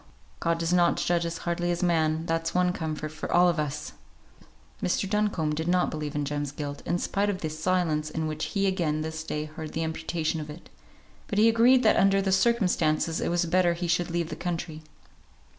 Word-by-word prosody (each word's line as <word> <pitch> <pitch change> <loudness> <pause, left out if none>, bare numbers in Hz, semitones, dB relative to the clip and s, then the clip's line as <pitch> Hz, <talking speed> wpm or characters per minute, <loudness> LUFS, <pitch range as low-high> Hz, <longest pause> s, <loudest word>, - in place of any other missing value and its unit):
God 165 0 +1
does 165 +1 -1
not 175 -1 +3
judge 170 -1 +1
as 165 0 -4
hardly 175 0 -1
as 175 +1 -1
man, 160 -2 +1
that's 165 0 -1
one 180 0 +3
comfort 155 -2 -4
for 155 - -6
all 180 +1 +5
of 170 -2 +1
us!" 150 0 -3 0.9
Mr. 180 +2 0
Duncombe 200 -7 0
did 160 +2 -3
not 180 0 +2
believe 150 -1 -4
in 145 -1 -1
Jem's 145 -1 -3
guilt, 145 -1 -6
in 175 - +1
spite 200 +3 0
of 185 -2 -3
the 155 - -2
silence 155 -2 0
in 160 +1 -3
which 155 0 -3
he 200 -2 -1
again 170 -5 0
this 160 0 -4
day 150 -1 -3
heard 155 0 -8
the 165 - -1
imputation 160 0 -2
of 150 - -8
it; 150 +4 -11 0.6
but 205 - -3
he 215 +2 +6
agreed 240 +3 +5
that - - +4
under 195 0 +4
the 195 -1 0
circumstances 180 -7 +2
it - - 0
was 175 0 +1
better 175 +1 +3
he 175 +1 -3
should 170 +1 +1
leave 170 -1 -1
the 155 - -5
country. 165 -2 -4
170 Hz, 210 wpm, -27 LUFS, 155-180 Hz, 0.9 s, he